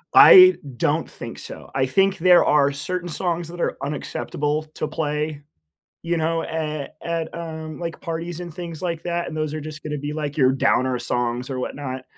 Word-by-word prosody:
I 370 -1 +10 0.2
don't - - 0
think - - -8
so. - - -10
I 135 -1 +2
think 195 +6 +2
there 180 +1 +6
are 145 -1 +4
certain 175 +5 -4
songs 170 0 -2
that 175 +1 -9
are - - -1
unacceptable 150 +1 -2
to - - -2
play, 150 -1 -2 0.6
you 170 0 -1
know, 165 +1 0
at 155 -3 -4
at, 165 -1 -3
um, 160 -1 -6
like, 170 -1 -5
parties 165 +1 -4
and 175 -2 -6
things 170 -2 -7
like 170 -3 -3
that, 175 0 -2
and 155 - -6
those 155 -1 -2
are 155 - -4
just 155 +1 -8
gonna 150 -1 -3
be, 145 +1 -4
like, 150 -2 -3
your 130 -2 +5
downer 130 -1 +2
songs 125 +1 -2
or 130 - -3
whatnot, 130 -1 -5
155 Hz, 185 wpm, -23 LUFS, 145-170 Hz, 0.6 s, I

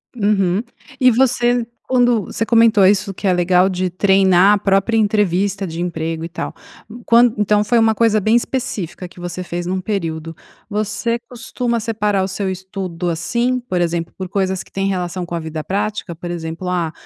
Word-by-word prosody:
Uhum. 200 -3 +1 0.4
E 255 -2 +6
você 245 -1 +2 0.2
quando 245 -4 +3
você 225 - -3
comentou 230 -3 +5
isso 195 +1 +2
que 200 - -8
é - - +4
legal 180 +1 +3
de 185 0 -1
treinar 190 +1 +4
a - - 0
própria 195 +3 +1
entrevista 200 -2 +1
de 165 -2 -6
emprego 165 -2 -3
e - - -4
tal, - - -5 0.5
quan 235 0 +5
então 210 0 +2
foi 235 +3 +1
uma 225 -1 +3
coisa 220 -1 +3
bem 215 +3 +2
específica 210 -8 -2
que 175 0 -14
você 175 +1 -5
fez 175 -1 -4
num 185 +2 -1
período. 165 -5 -4 0.3
Você 215 +3 -1
costuma 235 0 -3
separar 210 -3 0
o - - -1
seu 195 0 -3
estudo 185 -2 -4
assim? 235 +10 -1
Por 180 - 0
exemplo, 170 -1 -1
por 185 - -4
coisas 190 0 -1
que - - -23
têm 195 0 -1
relação 180 -1 -3
com 175 - -9
a - - -2
vida 160 -1 -5
prática? 205 -1 -3
Por 175 +2 -8
exemplo, 165 +1 -5
ah, 175 -3 -1
195 Hz, 185 wpm, -18 LUFS, 175-220 Hz, 0.5 s, E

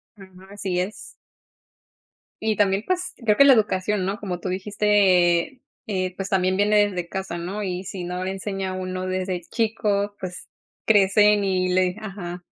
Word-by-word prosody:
Ajá, 195 -2 -14 0.2
así 195 -3 -2
es. 190 +4 -2 1.5
Y 220 -1 0
también, 195 0 +2
pues, 365 0 -1
creo 210 -2 +3
que - - +8
la 275 - +8
educación, 210 -3 +1
¿no?, 195 +2 -3
como 180 -4 -4
tú 185 - -4
dijiste, 195 +1 +2 0.3
eh, 185 -3 -2
pues, 195 0 -5
también 185 -1 +1
viene 205 0 +4
desde 180 -3 -4
casa, 190 -1 -5
¿no?, 190 +5 -4
y 185 -1 -3
si 185 -1 -6
no 180 +1 -4
le 190 - -2
enseña 195 -1 -4
uno 185 0 -4
desde 185 -1 -2
chico, 205 0 -1
pues, 180 -1 -7 0.4
crecen 210 0 +4
y 185 -1 0
le 185 +1 +3
di 180 - -13
ajá. 180 -4 -7
190 Hz, 165 wpm, -23 LUFS, 185-210 Hz, 1.5 s, que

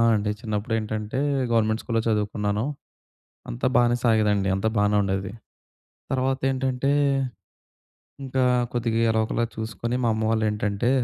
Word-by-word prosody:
అండి. 105 0 0
చిన్నప్పుడు 110 0 -3
ఏంటంటే, 110 +3 -3 0.3
గవర్నమెంట్ 110 -1 +2
స్కూల్లో 115 -2 0
చదువుకున్నాను. 105 0 0 0.9
అంతా - - -1
బానే 120 0 +3
సాగేదండి. 105 -4 +3
అంతా 110 +3 0
బానే 105 0 +3
ఉండేది. 95 0 -2 0.8
తర్వాతేంటంటే, 130 0 0 1.3
ఇంకా 130 0 0 0.3
కొద్దిగా 115 -2 0
ఎలాగొలా 110 +1 0
చూసుకొని, 115 +2 -3
మా - - +3
అమ్మ 110 - -2
వాళ్ళేంటంటే 105 0 0
110 Hz, 110 wpm, -25 LUFS, 105-120 Hz, 1.3 s, బానే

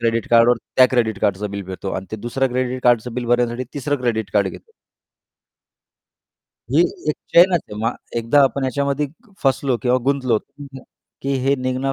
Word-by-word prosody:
Credit 115 -1 0
कार्डवर, 120 +1 +5 0.2
त्या 130 - +8
credit 110 -5 +1
कार्डचं 100 +1 0
बिल 100 0 -5
भेटतो 95 +1 -6
आणि 95 0 -5
ते 110 - -4
दुसरं 120 +5 -1
क्रेडिट 130 0 -2
कार्डचं 120 -1 +2
बिल 125 -1 -3
भरण्यासाठी 120 +1 +1
तिसरं 145 +1 -1
क्रेडिट 110 -5 -1
कार्ड 100 -2 +2
घेतो. - - -12 2.0
ही 145 +5 +4 0.3
एक - - -3 0.2
चेनच 180 +2 +7
असते. 105 - -12
मग 115 +3 -1 0.2
एकदा 115 +5 +3
आपण 135 0 +1
ह्याच्यामध्ये 140 +2 0 0.4
फसलो 135 -1 +1
किंवा 125 0 +3
गुंतलो, 130 -4 +1 0.8
की 140 - -1
हे 135 +1 +3
निघणं 130 +1 -1
125 Hz, 160 wpm, -20 LUFS, 115-135 Hz, 2.0 s, त्या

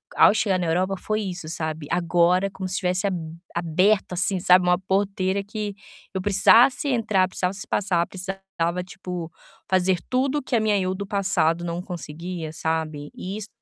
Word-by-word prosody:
ao - - +7
chegar 210 -4 +1
na 175 - -1
Europa 185 +4 +1
foi 215 +3 -2
isso, 180 -5 -5
sabe, 155 -2 -4
agora, 175 +2 +3
como 190 -1 -6
se 185 - -4
estivesse 185 0 0
ab 195 - -1 0.4
aberto, 180 +4 +2
assim, 180 +1 0
sabe, 180 0 +5
uma 180 0 +4
porteira 195 0 0
que 205 0 -5 0.4
eu 190 - -2
precisasse 225 +8 +5
entrar, 215 -7 +2
precisasse 190 +2 -3
passar, 175 -4 +1
precisava, 185 -2 -3
tipo, 180 -2 -7 0.4
fazer 185 -1 +2
tudo 270 +3 +1
que 260 - -2
a - - +4
minha 215 -2 +2
eu 185 0 0
do 200 +1 -5
passado 175 -4 +1
não 170 +1 -3
conseguia, 165 -1 -6
sabe. 160 -2 -3
E 190 +3 -6
isso 215 -1 -6
185 Hz, 165 wpm, -24 LUFS, 175-200 Hz, 0.4 s, ao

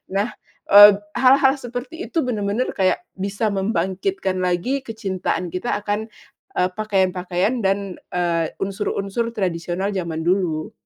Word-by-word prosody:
Nah, 205 +4 0 0.4
eee, 205 0 +10 0.2
hal-hal 265 +1 +6
seperti 250 +9 -6
itu 325 - 0
benar-benar 220 -1 -1
kayak 190 - +1 0.2
bisa 200 +3 -1
membangkitkan 190 - -1
lagi 180 +9 0
kecintaan 190 -7 -3
kita 185 +8 -2
akan, 210 +1 -2 0.5
eee, 180 0 +2
pakaian-pakaian 190 +1 0
dan, 195 -2 -1 0.2
eee, 170 -2 +1 0.2
unsur-unsur 200 +3 -2
tradisional 180 +1 -2
zaman 170 -5 -3
dulu. 170 -3 0
195 Hz, 115 wpm, -21 LUFS, 180-225 Hz, 0.5 s, eee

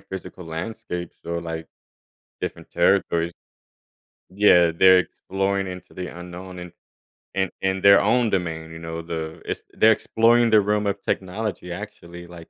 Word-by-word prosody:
physical 95 -1 -8
landscapes 90 +1 -6
or, 85 0 -3
like, 80 -1 -6 0.7
different - - -5
territories. 85 +1 +2 1.0
Yeah, 90 -4 +5
they're 95 +2 +6
exploring 95 +2 -2
into 90 -1 -9
the 90 -1 -5
unknown 90 +1 -9
in 90 -1 -8 0.6
in 95 -1 0
in 95 0 0
their 100 0 +7
own 120 -2 +3
domain, 80 -4 -2
you 80 - -9
know, 80 0 -5
the 80 -1 -5
it's - - -4
they're 110 +1 +5
exploring 115 +2 +3
the 110 -1 +6
realm 105 +1 0
of 100 0 -2
technology, 95 -1 -3
actually, 85 -3 -8
like, 85 -1 -12
90 Hz, 145 wpm, -23 LUFS, 85-100 Hz, 1.0 s, their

